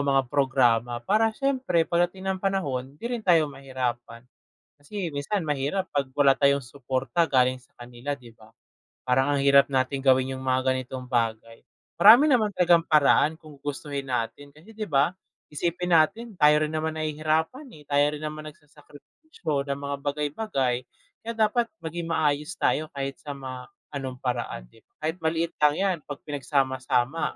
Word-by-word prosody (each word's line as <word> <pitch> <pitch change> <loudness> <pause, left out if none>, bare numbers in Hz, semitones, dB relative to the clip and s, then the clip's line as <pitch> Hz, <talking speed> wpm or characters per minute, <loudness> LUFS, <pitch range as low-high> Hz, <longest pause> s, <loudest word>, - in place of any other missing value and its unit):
mga 135 -1 +2
programa 125 -4 +2
para 220 +3 +3
siyempre 260 -12 +1
pagdating 175 +3 -1
ng 190 0 -1
panahon 140 -9 -2
hindi 150 - -14
rin 240 0 -2
tayo 160 -5 +3
mahirapan. 125 -3 -5 0.5
Kasi 175 +6 -6
minsan 155 +5 -3
mahirap 150 +7 -1
pag 140 -2 -1
wala 135 0 +4
tayong 140 0 +3
suporta 135 +5 -1
galing 130 -1 +2
sa - - -28
kanila, 120 +3 -6
'di 125 -5 -8
ba? 110 0 -19 0.5
Parang 130 +2 +2
ang - - 0
hirap 140 0 +5
natin 135 0 0
gawin 130 -1 +3
yung 130 - -7
mga 130 0 +1
ganitong 130 0 -5
bagay. 115 -2 -2 0.4
Marami 230 +9 +9
naman 245 -8 +3
talagang 175 -2 +5
paraan 155 +1 +4
kung 150 -3 -15
gustuhin 140 -1 -5
natin, 125 +4 -3
kasi 155 +10 -17
'di 215 -2 -6
ba 145 +4 +2 0.4
isipin 175 +4 -2
natin 195 +9 +3
tayo 150 +1 +5
rin 155 - -2
naman 160 0 -2
nahihirapan, 155 - -1
eh. 150 - -15
Tayo 145 +1 +2
rin 150 - -9
naman 155 0 -5
nagsasakripisyo 150 - -7
ng 140 - -1
mga 140 0 -2
bagay-bagay, 140 - -2 0.3
kaya 230 +1 -5
dapat 225 +2 +2 0.2
maging 165 +1 -4
maayos 150 +1 0
tayo 155 -2 0
kahit 135 0 -4
sa 145 -2 -7
ma 130 -2 -8 0.2
anong 135 -3 -5
paraan 120 - -3
'di - - -20
ba? - - -51
Kahit 160 +3 -1
maliit 165 +1 -1
lang 150 0 +4
'yan, 190 -1 0
pag 145 -1 -8
pinagsama-sama 135 -1 -1
145 Hz, 160 wpm, -26 LUFS, 130-165 Hz, 0.5 s, Marami